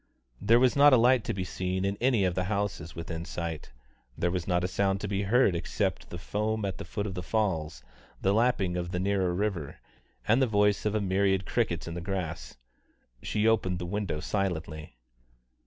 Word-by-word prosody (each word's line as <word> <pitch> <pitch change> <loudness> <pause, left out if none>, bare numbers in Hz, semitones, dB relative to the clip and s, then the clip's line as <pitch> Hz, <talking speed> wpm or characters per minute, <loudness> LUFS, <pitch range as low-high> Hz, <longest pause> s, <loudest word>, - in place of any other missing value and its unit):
There 115 +3 +5
was 130 0 +3
not 145 0 +7
a - - +8
light 125 0 +4
to - - -1
be 95 - -2
seen 95 +1 -2
in 100 0 0
any 120 -5 +3
of 90 - +1
the 90 +1 -1
houses 100 -5 -3
within 85 0 -5
sight, 85 -2 -5 0.5
there 85 - 0
was 90 -2 -3
not 90 -1 +1
a - - +1
sound 95 +1 0
to 105 - -3
be 100 0 -1
heard 105 -1 +3
except 85 - -2
the 85 - -6
foam 105 +4 -2
at 95 - -4
the - - -6
foot 105 -1 -4
of 100 - -4
the 90 - -4
falls, 80 - -1 0.4
the 95 - +2
lapping 105 -6 +1
of 85 0 -3
the 90 0 -2
nearer 95 -1 +1
river, 90 -5 -2 0.5
and 115 +5 +4
the 130 - +4
voice 105 -1 +2
of 105 - -1
a 110 - +1
myriad 95 0 +1
crickets 85 -10 -1
in 85 - -5
the 85 - -5
grass. 85 -10 -4 0.6
She 105 +1 0
opened 95 -5 +2
the 90 - -4
window 95 -4 -2
silently. 80 -8 -3
95 Hz, 205 wpm, -28 LUFS, 85-105 Hz, 0.6 s, a